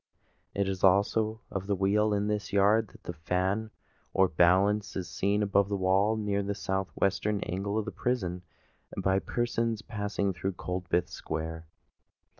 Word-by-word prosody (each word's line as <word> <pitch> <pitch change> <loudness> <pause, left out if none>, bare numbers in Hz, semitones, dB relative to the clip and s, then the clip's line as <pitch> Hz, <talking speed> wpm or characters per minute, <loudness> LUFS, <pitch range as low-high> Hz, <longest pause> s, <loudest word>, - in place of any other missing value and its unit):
It 100 -1 +1
is 95 -1 -3
also 105 +3 +3
of 95 0 -4
the 100 - +1
wheel 105 +3 +2
in 105 0 +1
this 105 -1 -2
yard 105 +2 +4
that - - -18
the 85 - -5
fan, 90 +6 -1 0.5
or 95 - +5
balance, 95 +5 +3
is 95 -2 -3
seen 100 +5 0
above 100 0 +2
the 100 - 0
wall 95 +4 +2
near 100 -2 0
the 100 0 -2
south 95 -1 -2
western 100 +2 +1
angle 100 +4 -2
of 110 - -1
the - - -4
prison, 90 -8 -2 0.6
by 95 0 +2
persons 115 +3 -1
passing 100 -2 -2
through 95 +3 -3
Coldbath 90 -1 -1
Square. 80 0 -5
100 Hz, 160 wpm, -29 LUFS, 95-105 Hz, 0.6 s, or